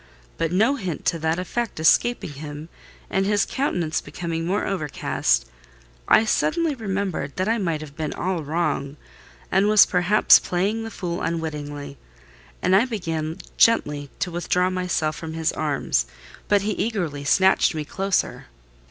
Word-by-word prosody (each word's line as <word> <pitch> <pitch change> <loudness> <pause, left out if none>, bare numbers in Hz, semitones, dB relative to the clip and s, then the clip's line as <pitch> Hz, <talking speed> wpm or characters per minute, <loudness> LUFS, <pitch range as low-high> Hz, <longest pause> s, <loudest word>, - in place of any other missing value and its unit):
But 165 -1 0
no 220 +10 +3
hint 185 - -5
to 165 - +1
that 160 +1 0
effect 220 +3 -3
escaping 170 +4 +3
him 145 +2 -8 0.4
and 190 - 0
his 205 0 +2
countenance 175 - -1
becoming 165 -1 -4
more 195 +3 0
overcast, 165 -8 0 0.6
I 220 - +5
suddenly 320 +7 +1
remembered 195 - -3
that 185 +1 -1
I 225 +1 +1
might 165 -6 -1
have 145 -2 -10
been 155 -1 -3
all 180 -2 -2
wrong, 150 -2 -2 0.5
and 195 +2 +3
was 215 -1 +7
perhaps 180 +3 +5
playing 200 +6 -1
the 225 - -5
fool 175 -5 -4
unwittingly; 145 -4 -4 0.6
and 185 - +4
I 205 +5 +5
began 165 -9 -3 0.2
gently 150 -11 +3
to 180 - -1
withdraw 180 +2 0
myself 180 -4 -1
from 160 -1 -6
his 160 0 0
arms—but 145 - -1
he 210 - 0
eagerly 180 -10 -2
snatched 190 +3 +3
me 155 -1 -3
closer. 195 +4 -1
175 Hz, 145 wpm, -23 LUFS, 155-200 Hz, 0.6 s, was